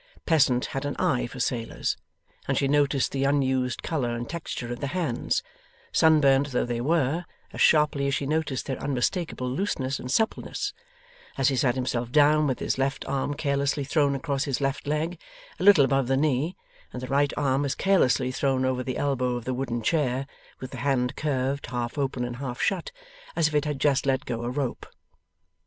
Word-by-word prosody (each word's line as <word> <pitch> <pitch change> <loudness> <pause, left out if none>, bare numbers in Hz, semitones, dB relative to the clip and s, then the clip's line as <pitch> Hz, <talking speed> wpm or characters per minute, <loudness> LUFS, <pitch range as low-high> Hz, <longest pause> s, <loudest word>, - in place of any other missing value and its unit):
Pleasant 135 -6 +3
had 135 - -2
an 145 0 -3
eye 125 -2 +1
for 125 - -10
sailors, 120 -2 -1 0.5
and - - +1
she 140 - +2
noticed 140 -1 +2
the 135 0 -1
unused 130 -3 +1
colour 125 -7 -1
and 120 0 -4
texture 135 -7 -5
of 120 - -8
the 140 - -2
hands, 155 -10 0 0.5
sunburnt 145 -3 +4
though 125 - +1
they 120 -1 -2
were, 160 +3 +1 0.3
as - - -4
sharply 150 -3 +4
as 140 - +1
she 140 - -2
noticed 150 -2 -1
their 135 - -4
unmistakable 140 +1 -1
looseness 135 -2 -1
and 125 - -7
suppleness, 220 - -1 0.6
as 135 0 +3
he 135 - 0
sat 125 -1 +2
himself 125 -2 -2
down 150 +1 +5
with 130 - 0
his - - -2
left 135 0 -1
arm 140 +1 -1
carelessly 140 0 0
thrown 145 0 +2
across 135 +1 -1
his 135 -4 -1
left 135 +1 -2
leg 155 +3 -1 0.4
a - - -2
little 190 -8 +7
above 135 -1 +1
the 135 +1 +2
knee, 150 +4 +1 0.4
and 125 - -7
the - - -4
right 140 +1 +2
arm 140 -1 +1
as 140 - -1
carelessly 130 -9 +2
thrown 130 0 +1
over 130 -1 0
the 130 0 -3
elbow 130 -3 0
of 120 -1 -5
the 130 - -1
wooden 120 -3 -3
chair, 135 -1 +1 0.3
with 130 - -7
the 130 - -7
hand 125 -1 0
curved, 140 -2 -1
half 120 -1 -3
open 130 -3 -1
and 120 0 -5
half 125 -1 -5
shut, - - 0 0.4
as 165 -2 +3
if 155 - -5
it 150 0 +2
had 150 -2 -2
just 140 -1 +2
let 130 -1 +1
go 115 -2 -3
a 120 - -2
rope. 130 -1 -3
135 Hz, 195 wpm, -26 LUFS, 125-145 Hz, 0.6 s, little